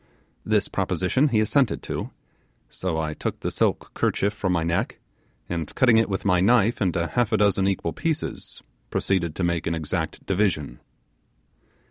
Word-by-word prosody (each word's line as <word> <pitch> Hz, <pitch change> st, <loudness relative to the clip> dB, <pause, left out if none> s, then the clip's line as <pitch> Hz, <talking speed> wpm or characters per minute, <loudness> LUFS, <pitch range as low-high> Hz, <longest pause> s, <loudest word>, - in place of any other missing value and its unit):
This -, -, +1 dB
proposition 130 Hz, +11 st, +1 dB
he 120 Hz, -6 st, +2 dB
assented 125 Hz, +3 st, +1 dB
to; -, -, -4 dB, 0.6 s
so 90 Hz, -3 st, -3 dB
I 80 Hz, -1 st, -2 dB
took -, -, -4 dB
the -, -, -2 dB
silk -, -, 0 dB
kerchief 100 Hz, +1 st, 0 dB
from 95 Hz, -3 st, -1 dB
my 85 Hz, -2 st, +1 dB
neck, 85 Hz, +1 st, -1 dB, 0.5 s
and 85 Hz, -3 st, -4 dB
cutting 120 Hz, -4 st, +5 dB
it 115 Hz, -1 st, +3 dB
with 95 Hz, +1 st, -3 dB
my 90 Hz, -3 st, +4 dB
knife 110 Hz, +3 st, +3 dB
into 85 Hz, -3 st, +1 dB
half 120 Hz, +5 st, 0 dB
a 110 Hz, -, +3 dB
dozen 100 Hz, -1 st, +3 dB
equal 95 Hz, -4 st, -1 dB
pieces, 160 Hz, -2 st, -3 dB, 0.3 s
proceeded 85 Hz, -5 st, 0 dB
to 95 Hz, -, -2 dB
make 85 Hz, -1 st, 0 dB
an 85 Hz, -, 0 dB
exact 80 Hz, -2 st, -3 dB
division. 95 Hz, -7 st, 0 dB
95 Hz, 160 wpm, -24 LUFS, 85-110 Hz, 0.6 s, cutting